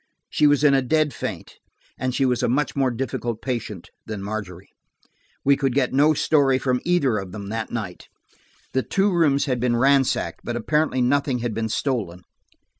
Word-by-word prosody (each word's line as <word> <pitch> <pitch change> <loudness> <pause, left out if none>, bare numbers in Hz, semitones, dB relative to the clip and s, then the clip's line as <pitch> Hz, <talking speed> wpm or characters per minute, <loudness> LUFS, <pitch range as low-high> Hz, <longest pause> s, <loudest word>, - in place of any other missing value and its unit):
She 150 - +4
was 145 0 +3
in 145 -2 +5
a 135 - +4
dead 150 +2 +1
faint, - - -6 0.4
and 130 -1 -3
she 135 - +2
was 125 -2 +1
a 125 - +1
much 145 +5 0
more 135 -2 +2
difficult 120 -2 -3
patient 115 -8 -5 0.2
than 105 -3 -5
Margery. 100 -3 -6 0.8
We 140 0 +5
could 135 -2 -1
get 130 -3 +1
no 150 +3 +4
story 140 -3 +3
from 125 -1 0
either 140 -11 +2
of 95 -1 -8
them 100 -2 -7
that 110 0 -3
night. 100 -6 -5 0.7
The 130 - +2
two 195 +7 +1
rooms 150 -5 +3
had 130 -4 -1
been 120 0 +1
ransacked, 135 +1 +2
but 120 - -4
apparently 150 +3 0
nothing 140 0 +1
had 115 - -2
been 110 +1 -2
stolen. 110 -8 -2
130 Hz, 185 wpm, -23 LUFS, 115-140 Hz, 0.8 s, in